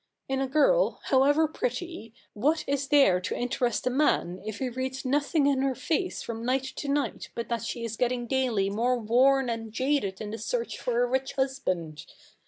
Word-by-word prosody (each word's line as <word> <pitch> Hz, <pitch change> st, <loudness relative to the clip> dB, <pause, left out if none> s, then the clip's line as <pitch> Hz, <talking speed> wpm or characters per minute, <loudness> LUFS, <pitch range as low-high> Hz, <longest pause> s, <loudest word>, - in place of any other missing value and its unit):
In 270 Hz, 0 st, -1 dB
a 270 Hz, -, 0 dB
girl, 405 Hz, -, +3 dB
however 290 Hz, +4 st, +4 dB
pretty, 340 Hz, -, -4 dB, 0.2 s
what 300 Hz, +9 st, +1 dB
is 280 Hz, 0 st, -1 dB
there 270 Hz, -12 st, +5 dB
to -, -, -3 dB
interest 245 Hz, -1 st, -1 dB
a 255 Hz, -, +1 dB
man 245 Hz, -, +1 dB
if 215 Hz, 0 st, -5 dB
he 265 Hz, -, -2 dB
reads 260 Hz, +2 st, -4 dB
nothing 285 Hz, +3 st, +1 dB
in 275 Hz, -2 st, +2 dB
her 270 Hz, -1 st, 0 dB
face 360 Hz, +7 st, -2 dB
from 230 Hz, -1 st, -5 dB
night 255 Hz, +2 st, +1 dB
to 290 Hz, -, -4 dB
night 285 Hz, 0 st, -1 dB
but 235 Hz, -, -4 dB
that 235 Hz, -1 st, -1 dB
she 230 Hz, 0 st, -4 dB
is 225 Hz, -1 st, -5 dB
getting 245 Hz, -1 st, 0 dB
daily 240 Hz, -6 st, +1 dB
more 240 Hz, +4 st, +1 dB
worn 255 Hz, +4 st, +3 dB
and 230 Hz, -2 st, -4 dB
jaded 260 Hz, -6 st, 0 dB
in 210 Hz, -1 st, -5 dB
the 225 Hz, -, -5 dB
search 485 Hz, -2 st, -3 dB
for 245 Hz, -1 st, +1 dB
a -, -, +1 dB
rich 265 Hz, +2 st, -1 dB
husband? 185 Hz, -, -2 dB
260 Hz, 190 wpm, -27 LUFS, 230-280 Hz, 0.2 s, there